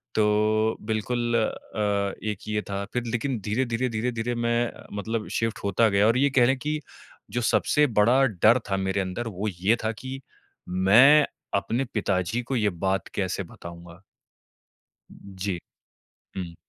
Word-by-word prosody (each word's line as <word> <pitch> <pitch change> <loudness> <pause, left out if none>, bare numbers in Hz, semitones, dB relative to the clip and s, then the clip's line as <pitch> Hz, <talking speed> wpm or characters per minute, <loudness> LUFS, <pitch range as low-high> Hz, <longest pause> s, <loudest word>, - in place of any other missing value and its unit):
तो 110 +1 +2
बिल्कुल 120 +2 -1
अ, 105 -3 -1 0.2
एक 100 - -7
ये 105 0 -1
था, 100 0 -2
फिर 125 -1 -1
लेकिन 120 +2 -2
धीरे-धीरे, 120 +3 0
धीरे-धीरे 115 +1 -2
मैं 120 0 0 0.3
मतलब 110 +1 -3
शिफ्ट 115 0 -1
होता 100 +3 +3
गया 100 +1 +3
और 115 +2 +3
ये 140 +2 +3
कह 130 -3 +5
लें 130 +2 +2
कि, 150 +4 -2 0.5
जो 120 - -1
सबसे 150 +5 +3
बड़ा 125 +6 +5
डर 115 +2 +4
था 95 - +1
मेरे 95 +1 0
अंदर 95 +6 -4
वो 105 0 -4
ये 95 +3 +1
था 110 - +1
कि 130 +4 -7 0.5
मैं 115 +12 +6 0.3
अपने 115 +6 0
पिताजी 100 +1 0
को 130 - -3
ये 105 -4 +2 0.2
बात 95 -1 0
कैसे 95 0 -1
बताऊँगा? 85 +1 -12 1.1
जी, 95 -2 -5 0.8
हुँ। 90 -3 -5
110 Hz, 145 wpm, -25 LUFS, 100-120 Hz, 1.1 s, मैं